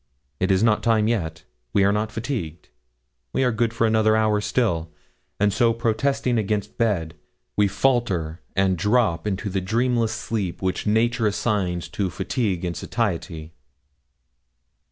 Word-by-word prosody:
It 95 - +1
is 95 +2 +3
not 110 -2 +3
time 110 -2 +3
yet; 85 -9 -2 0.3
we 100 - +4
are 100 - +4
not 105 +1 -1
fatigued; 110 - -4 0.6
we - - +2
are 125 - +3
good 115 0 0
for 115 0 +1
another 110 0 +3
hour 110 -1 +2
still, 85 -9 0 0.5
and 105 -1 +3
so 115 0 +3
protesting 120 +2 0
against 105 0 -2
bed, 95 -9 0 0.4
we 105 -1 +4
falter 95 -7 0
and 95 -2 +2
drop 105 -2 +2
into 100 +1 -2
the 95 -1 -1
dreamless 115 +3 +1
sleep 105 -6 -3
which 95 +2 -2
nature 115 +1 +2
assigns 100 -5 -1
to 100 -3 -2
fatigue 95 - -2
and 85 -1 -2
satiety. 85 -7 -3
105 Hz, 145 wpm, -23 LUFS, 95-115 Hz, 0.6 s, we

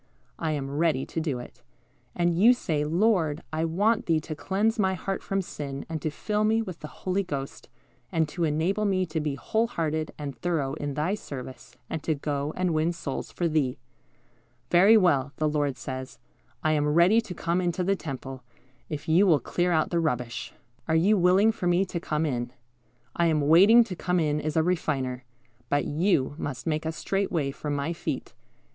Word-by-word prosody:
I 160 -2 -1
am 140 -2 -3
ready 155 -5 +1
to - - -4
do 150 -5 -1
it." 120 0 -11 0.5
And 175 -1 +1
you 225 +8 +6
say, 155 -10 -1
"Lord, 165 -2 +1
I 160 +1 0
want 205 +7 +1
Thee 165 -2 +3
to 155 - -6
cleanse 205 +7 0
my 190 -2 +2
heart 195 +1 -3
from 195 0 -1
sin, 140 -5 -6
and 160 -2 -4
to 155 - -1
fill 210 +7 -1
me 220 +1 +3
with 185 -7 -5
the 150 - -7
Holy 185 +5 -2
Ghost, 140 -7 -6 0.4
and 160 -1 +1
to 170 +2 -3
enable 165 +7 +1
me 190 -2 +1
to 160 -1 -3
be 150 -2 -2
whole 220 - 0
hearted 155 -7 -2
and 145 -2 -5
thorough 155 -6 -1
in 145 -2 -4
Thy 155 +7 0
service, 130 - -8
and 160 - -4
to 155 +1 0
go 145 0 -2
and 180 -2 +1
win 160 +2 +1
souls 140 -5 -5
for 175 - -1
Thee." 150 -6 0 0.9
"Very 195 +6 +7
well," 145 -8 +2
the 155 - +1
Lord 145 -3 0
says, 130 +1 -6 0.5
"I 155 - +3
am 150 -1 +2
ready 185 +7 +5
to 200 -6 -8
come 170 +3 0
into 175 0 -1
the 195 +2 +2
temple, 135 -5 -7 0.5
if 150 -2 -5
you 175 +5 +5
will 160 -5 +5
clear 175 +5 -1
out 160 -2 +1
the 170 - +2
rubbish. 125 -6 -2 0.4
Are 160 - +2
you 190 +7 +4
willing 190 +4 +4
for 190 -5 -3
Me 175 +2 +3
to 175 -2 -4
come 155 -1 -1
in? 120 -4 -2 0.6
I 170 - +2
am 155 -2 +2
waiting 190 +11 +7
to 205 -5 -6
come 180 +1 0
in 150 -2 0
as 155 +1 -2
a 160 - +4
Refiner; 135 -7 -1 0.4
but 145 0 +1
you 150 -3 +1
must 130 -3 -5
make 160 -1 -1
a - - 0
straight 195 +5 -2
way 145 -6 0
for 150 +2 -6
my 145 +3 -1
feet. - - -4
160 Hz, 200 wpm, -27 LUFS, 145-185 Hz, 0.9 s, Very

